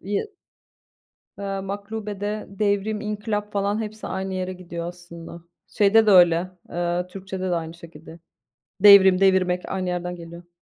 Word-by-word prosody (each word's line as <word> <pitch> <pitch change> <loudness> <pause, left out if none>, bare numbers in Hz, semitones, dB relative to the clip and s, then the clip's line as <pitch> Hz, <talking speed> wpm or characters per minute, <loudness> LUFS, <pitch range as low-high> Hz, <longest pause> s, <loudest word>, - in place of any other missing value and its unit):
Yı 205 - -3 1.1
eee, 195 -1 -3
maklubede 205 +1 -5
devrim, 205 +1 -1
inkılap 210 0 -3
falan 205 +2 0
hepsi 215 0 -7
aynı 190 0 -4
yere 185 0 -3
gidiyor 170 -2 -7
aslında. 170 -1 -10 0.3
Şeyde 215 +2 +4
de - - +6
öyle, 175 -1 +5 0.2
eee, 175 +1 -2
Türkçe'de 185 0 -6
de 175 - +1
aynı 165 -1 -4
şekilde. 165 -1 -13 0.6
Devrim, 190 -2 +8
devirmek 185 -2 +2
aynı 185 -1 -2
yerden 180 0 -3
geliyor. 170 0 -11
190 Hz, 135 wpm, -23 LUFS, 175-205 Hz, 1.1 s, Devrim